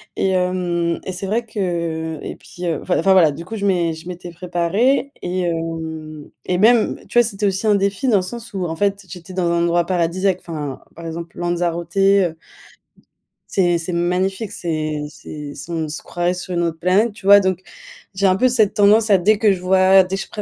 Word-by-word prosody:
Et 195 Hz, -, +1 dB
hem 180 Hz, -2 st, 0 dB
et 190 Hz, -, -3 dB
c'est 185 Hz, +2 st, -5 dB
vrai 225 Hz, +4 st, -1 dB
que 170 Hz, -6 st, -3 dB
et -, -, -6 dB
puis 180 Hz, 0 st, -9 dB
heu, 165 Hz, -, -1 dB
enfin 180 Hz, -, 0 dB
enfin 195 Hz, -, +3 dB
voilà, 165 Hz, -5 st, +5 dB
du 160 Hz, +4 st, -8 dB
coup 225 Hz, -, -6 dB
je 200 Hz, -, -2 dB
m'é 175 Hz, -4 st, +1 dB
je 160 Hz, +2 st, -11 dB
m'étais 175 Hz, -1 st, -7 dB
préparée 185 Hz, +11 st, 0 dB
et 180 Hz, +1 st, -2 dB
hem, 160 Hz, -3 st, -4 dB, 0.2 s
et 180 Hz, -, 0 dB
même, 220 Hz, +3 st, +4 dB
tu -, -, -2 dB
vois, 240 Hz, -, +6 dB
c'était 210 Hz, -2 st, -3 dB
aussi 195 Hz, +2 st, 0 dB
un 210 Hz, -, +5 dB
défi 200 Hz, +5 st, 0 dB
dans 220 Hz, -5 st, +4 dB
le -, -, +1 dB
sens 235 Hz, +4 st, -8 dB
où 185 Hz, -2 st, -2 dB
en 160 Hz, -, -3 dB
fait, 200 Hz, -1 st, 0 dB
j'étais 180 Hz, 0 st, -10 dB
dans 175 Hz, -2 st, 0 dB
un 170 Hz, 0 st, +1 dB
endroit 170 Hz, 0 st, +2 dB
paradisiaque, 185 Hz, +2 st, 0 dB
enfin 150 Hz, -5 st, -6 dB, 0.2 s
par 165 Hz, 0 st, -10 dB
exemple 165 Hz, +1 st, -7 dB
Lanzarote, 175 Hz, 0 st, -2 dB
heu 195 Hz, -4 st, +3 dB, 1.1 s
c'est 175 Hz, -3 st, +2 dB
c'est 170 Hz, +2 st, -4 dB
magnifique, 185 Hz, +4 st, -1 dB
c'est 155 Hz, -4 st, -3 dB
c'est 150 Hz, -1 st, -9 dB
c'est 155 Hz, +5 st, -9 dB
on 160 Hz, -1 st, -2 dB
se 150 Hz, -, -5 dB
croirait 175 Hz, +1 st, -1 dB
sur 180 Hz, 0 st, -6 dB
une 175 Hz, -, 0 dB
autre 165 Hz, -1 st, -2 dB
planète, 195 Hz, +6 st, +2 dB
tu 205 Hz, -2 st, -15 dB
vois, 200 Hz, +1 st, +9 dB
donc 185 Hz, -1 st, -1 dB, 0.5 s
j'ai 195 Hz, +1 st, +2 dB
un 185 Hz, -, +4 dB
peu 255 Hz, -, +4 dB
cette 225 Hz, -5 st, +2 dB
tendance 210 Hz, +2 st, +4 dB
à 195 Hz, -, +6 dB
dès 205 Hz, +4 st, +3 dB
que 210 Hz, -1 st, +4 dB
je 190 Hz, -, -1 dB
vois, 190 Hz, +1 st, +5 dB
dès 185 Hz, +1 st, -3 dB
que 195 Hz, -, -3 dB
je -, -, -14 dB
pré 210 Hz, -, -6 dB
180 Hz, 220 wpm, -20 LUFS, 170-195 Hz, 1.1 s, vois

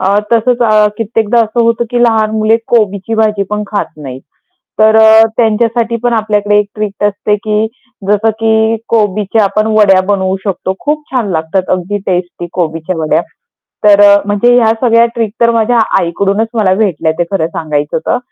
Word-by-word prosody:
अ, 195 Hz, +2 st, +1 dB, 0.2 s
तसेच 235 Hz, +2 st, +2 dB, 0.4 s
कित्येकदा 225 Hz, +1 st, 0 dB
असं 225 Hz, +2 st, -2 dB
होतं, 230 Hz, +1 st, 0 dB
की 240 Hz, 0 st, 0 dB
लहान 220 Hz, -2 st, +2 dB
मुले 220 Hz, +1 st, +2 dB
कोबीची 215 Hz, -1 st, 0 dB
भाजी 215 Hz, -2 st, 0 dB
पण 210 Hz, 0 st, -2 dB
खात 205 Hz, 0 st, -2 dB
नाहीत. 135 Hz, -3 st, -9 dB, 0.6 s
तर 220 Hz, 0 st, +5 dB
अ, 220 Hz, 0 st, +6 dB
त्यांच्यासाठी 230 Hz, 0 st, 0 dB
पण 240 Hz, -1 st, 0 dB
आपल्याकडे 210 Hz, -2 st, 0 dB
एक 210 Hz, -, 0 dB
ट्रिक 210 Hz, -1 st, -4 dB
असते, 205 Hz, +1 st, 0 dB
की 210 Hz, +1 st, -1 dB, 0.4 s
जसं 210 Hz, +2 st, +2 dB
की 220 Hz, 0 st, +1 dB
कोबीच्या 210 Hz, -1 st, 0 dB
आपण 215 Hz, +2 st, 0 dB
वड्या 195 Hz, -3 st, +4 dB
बनवू 190 Hz, -2 st, 0 dB
शकतो. 190 Hz, -1 st, -3 dB
खूप 300 Hz, +1 st, -2 dB
छान 240 Hz, -7 st, -2 dB
लागतात, 160 Hz, +3 st, -1 dB
अगदी 185 Hz, +3 st, -2 dB
टेस्टी 175 Hz, -1 st, -3 dB
कोबीच्या 165 Hz, 0 st, -3 dB
वड्या. 155 Hz, -1 st, 0 dB, 0.6 s
तर 205 Hz, -1 st, +6 dB
अ, 200 Hz, 0 st, +7 dB
म्हणजे 205 Hz, +4 st, +2 dB
ह्या 225 Hz, -2 st, +3 dB
सगळ्या 230 Hz, -1 st, +4 dB
ट्रिक 225 Hz, -3 st, -2 dB
तर 235 Hz, 0 st, +4 dB
माझ्या 230 Hz, +1 st, +1 dB, 0.2 s
आईकडूनच 195 Hz, +5 st, -1 dB
मला 205 Hz, -5 st, +1 dB
भेटल्या, 175 Hz, -6 st, 0 dB
ते 175 Hz, -, +3 dB
खरं 165 Hz, -5 st, 0 dB
सांगायचं 150 Hz, -3 st, -3 dB
तर. -, -, +1 dB
210 Hz, 165 wpm, -11 LUFS, 195-225 Hz, 0.6 s, अ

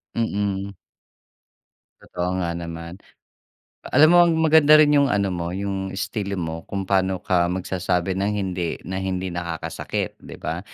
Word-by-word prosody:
Mm. 100 Hz, -3 st, -1 dB, 1.3 s
Totoo 90 Hz, +1 st, -3 dB
nga 85 Hz, -1 st, -1 dB
naman. 85 Hz, 0 st, -7 dB, 0.9 s
Alam 155 Hz, +4 st, +6 dB
mo 175 Hz, -, +7 dB, 0.3 s
maganda 155 Hz, -1 st, +7 dB
rin 150 Hz, -1 st, +5 dB
yung 140 Hz, -1 st, +4 dB
ano 100 Hz, -4 st, 0 dB
mo 85 Hz, -1 st, -3 dB
yung 95 Hz, -1 st, -3 dB
istilo 100 Hz, 0 st, -3 dB
mo 80 Hz, -1 st, -5 dB
kung 100 Hz, -1 st, -3 dB
paano 95 Hz, -1 st, 0 dB
ka 90 Hz, -2 st, +2 dB
magsasabi 90 Hz, 0 st, -1 dB
ng 100 Hz, +2 st, 0 dB
"hindi" 90 Hz, -4 st, -2 dB
na 95 Hz, +3 st, -4 dB
hindi 95 Hz, -1 st, -3 dB
nakakasakit 85 Hz, -2 st, -4 dB
di -, -, -11 dB
ba? -, -, -4 dB
95 Hz, 140 wpm, -23 LUFS, 90-100 Hz, 1.3 s, mo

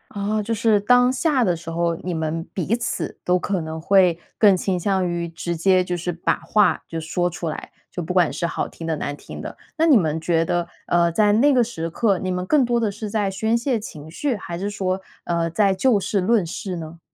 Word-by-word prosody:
哦， 210 Hz, +2 st, -1 dB
就 225 Hz, +2 st, -2 dB
是 215 Hz, -1 st, +3 dB
当 245 Hz, +4 st, +4 dB
下 265 Hz, -1 st, +1 dB
的 180 Hz, -5 st, +2 dB
时 165 Hz, 0 st, -9 dB
候， 170 Hz, 0 st, 0 dB
你 180 Hz, +1 st, -4 dB
们 160 Hz, 0 st, -3 dB
彼 190 Hz, +4 st, 0 dB
此 235 Hz, -1 st, -3 dB
都 180 Hz, 0 st, +3 dB
可 190 Hz, 0 st, -1 dB
能 160 Hz, 0 st, -5 dB
会 180 Hz, -2 st, +4 dB, 0.2 s
更 205 Hz, -3 st, +6 dB
倾 185 Hz, 0 st, -1 dB
向 190 Hz, -1 st, +1 dB
于 170 Hz, 0 st, -2 dB
直 170 Hz, +1 st, -4 dB
接 185 Hz, +2 st, +3 dB
就 180 Hz, -1 st, -3 dB
是 175 Hz, +1 st, -3 dB
把 170 Hz, -, 0 dB
话 210 Hz, -1 st, +2 dB
就 165 Hz, -, -4 dB
说 175 Hz, +3 st, -1 dB
出 170 Hz, -1 st, -4 dB
来， -, -, -7 dB, 0.2 s
就 175 Hz, -, -4 dB
不 170 Hz, +2 st, -4 dB
管 180 Hz, -3 st, +3 dB
是 170 Hz, -, -2 dB
好 -, -, -2 dB
听 165 Hz, -, -8 dB
的 160 Hz, -, 0 dB
难 145 Hz, -1 st, -4 dB
听 -, -, -9 dB
的。 -, -, -8 dB, 0.2 s
那 325 Hz, -, +3 dB
你 295 Hz, -6 st, +7 dB
们 160 Hz, -5 st, 0 dB
觉 165 Hz, -1 st, +1 dB
得 175 Hz, 0 st, -1 dB, 0.2 s
呃 170 Hz, -1 st, +3 dB
在 205 Hz, +4 st, +3 dB
那 275 Hz, +7 st, +4 dB
个 250 Hz, -, +4 dB
时 165 Hz, -8 st, -4 dB
刻， 200 Hz, +2 st, +1 dB
你 185 Hz, -1 st, -2 dB
们 180 Hz, 0 st, -2 dB
更 290 Hz, +5 st, +3 dB
多 240 Hz, -1 st, +1 dB
地 225 Hz, -, +1 dB
是 210 Hz, +1 st, -6 dB
在 205 Hz, -2 st, 0 dB
宣 220 Hz, +4 st, 0 dB
泄 240 Hz, -1 st, 0 dB
情 155 Hz, -6 st, -9 dB
绪， 255 Hz, -, -1 dB
还 170 Hz, -3 st, -6 dB
是 200 Hz, +3 st, -3 dB
说 190 Hz, -2 st, -2 dB, 0.2 s
呃 170 Hz, -1 st, 0 dB
在 195 Hz, +3 st, +2 dB
就 215 Hz, +2 st, +3 dB
事 195 Hz, 0 st, -1 dB
论 210 Hz, -1 st, +2 dB
事 180 Hz, +2 st, -5 dB
呢？ 165 Hz, 0 st, -8 dB
185 Hz, 250 characters per minute, -22 LUFS, 170-215 Hz, 0.2 s, 你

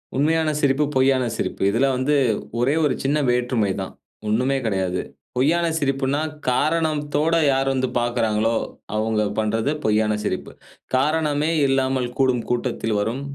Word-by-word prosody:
உண்மையான 155 Hz, +3 st, +2 dB
சிரிப்பு, 140 Hz, +1 st, +2 dB
பொய்யான 130 Hz, -1 st, +3 dB
சிரிப்பு 95 Hz, -, -3 dB
இதில 115 Hz, +6 st, +2 dB
வந்து 140 Hz, +4 st, +1 dB, 0.4 s
ஒரே 135 Hz, +5 st, +2 dB
ஒரு 145 Hz, -, +2 dB
சின்ன 145 Hz, +3 st, +1 dB
வேற்றுமை 120 Hz, -4 st, +1 dB
தான். 95 Hz, -, -6 dB, 0.3 s
ஒண்ணுமே 130 Hz, +6 st, +1 dB
கெடையாது. 95 Hz, -3 st, -1 dB, 0.4 s
பொய்யான 170 Hz, +6 st, +2 dB
சிரிப்புன்னா, 135 Hz, +1 st, 0 dB, 0.3 s
காரணத்தோட 155 Hz, +1 st, 0 dB, 0.2 s
யார் 135 Hz, 0 st, 0 dB
வந்து 130 Hz, -1 st, 0 dB
பார்க்கிறாங்களோ, 115 Hz, -2 st, 0 dB, 0.4 s
அவங்க 110 Hz, 0 st, 0 dB, 0.2 s
பண்றது 110 Hz, +5 st, 0 dB
பொய்யான 105 Hz, 0 st, +2 dB
சிரிப்பு. 95 Hz, -, -3 dB, 0.4 s
காரணமே 150 Hz, +2 st, +1 dB, 0.2 s
இல்லாமல் 130 Hz, -2 st, 0 dB
கூடும் 130 Hz, -3 st, +2 dB
கூட்டத்தில் 120 Hz, -3 st, -1 dB
வரும் 115 Hz, +6 st, -2 dB
130 Hz, 125 wpm, -22 LUFS, 115-145 Hz, 0.4 s, பொய்யான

